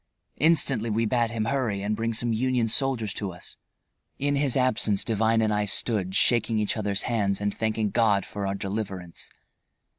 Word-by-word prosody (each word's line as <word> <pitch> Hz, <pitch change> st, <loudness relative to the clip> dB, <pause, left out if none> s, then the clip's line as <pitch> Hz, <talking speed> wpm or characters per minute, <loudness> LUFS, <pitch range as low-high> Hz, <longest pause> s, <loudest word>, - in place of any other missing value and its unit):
Instantly 140 Hz, -8 st, +3 dB
we 115 Hz, +2 st, 0 dB
bade 120 Hz, 0 st, +1 dB
him 110 Hz, -1 st, -2 dB
hurry 115 Hz, -6 st, -1 dB
and 105 Hz, +1 st, -1 dB
bring 115 Hz, +1 st, -2 dB
some 115 Hz, +1 st, -1 dB
Union 125 Hz, 0 st, +1 dB
soldiers 115 Hz, -4 st, +1 dB
to 100 Hz, -3 st, -4 dB
us. 90 Hz, -, -10 dB, 0.6 s
In 145 Hz, +1 st, 0 dB
his 140 Hz, -2 st, +1 dB
absence 115 Hz, -5 st, +1 dB
Devine 110 Hz, 0 st, +1 dB
and 110 Hz, -1 st, +1 dB
I 105 Hz, 0 st, 0 dB
stood 100 Hz, -2 st, 0 dB
shaking 115 Hz, +1 st, +2 dB
each 105 Hz, -1 st, 0 dB
other's 105 Hz, -2 st, -2 dB
hands 100 Hz, -5 st, 0 dB
and 105 Hz, 0 st, -1 dB
thanking 110 Hz, -2 st, -1 dB
God 105 Hz, -4 st, +2 dB
for 100 Hz, -1 st, -5 dB
our 95 Hz, -, -2 dB
deliverance. 95 Hz, -3 st, -5 dB
110 Hz, 175 wpm, -26 LUFS, 100-120 Hz, 0.6 s, Instantly